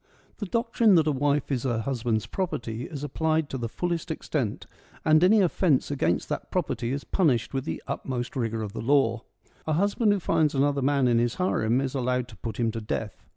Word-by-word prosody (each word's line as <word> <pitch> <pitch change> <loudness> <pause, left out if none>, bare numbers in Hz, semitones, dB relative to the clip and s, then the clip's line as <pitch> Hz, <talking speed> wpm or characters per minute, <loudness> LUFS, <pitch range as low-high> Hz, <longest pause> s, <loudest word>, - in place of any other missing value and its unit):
The 205 - -3
doctrine 230 -1 +3
that 160 -3 +4
a 155 - +2
wife 145 +1 0
is 130 -3 0
her 120 -3 -1
husband's 115 -4 -1
property 120 - -3
is 145 -2 -7
applied 155 +1 0
to 135 - -2
the 115 -1 -3
fullest 175 +4 -3
extent, 140 -8 -3 0.4
and 155 +1 +5
any 210 +3 +6
offence 165 -6 +2
against 90 -12 0
that - - -4
property 120 0 -1
is 140 +1 -3
punished 140 - +1
with 135 0 -2
the - - -4
utmost 125 -1 -4
rigour 115 -3 -1
of 100 -2 -6
the - - -5
law. 120 -3 +2 0.5
A 155 - +1
husband 205 +5 +2
who 205 - +2
finds 160 -4 +1
another 140 +1 +2
man 135 -1 +2
in 120 -1 +3
his 120 0 0
harem 125 -10 +1
is 135 -1 -2
allowed 125 -2 0
to - - -13
put 115 - -6
him 115 -1 +1
to 115 - -5
death. 105 -2 -5
135 Hz, 205 wpm, -26 LUFS, 120-160 Hz, 0.5 s, any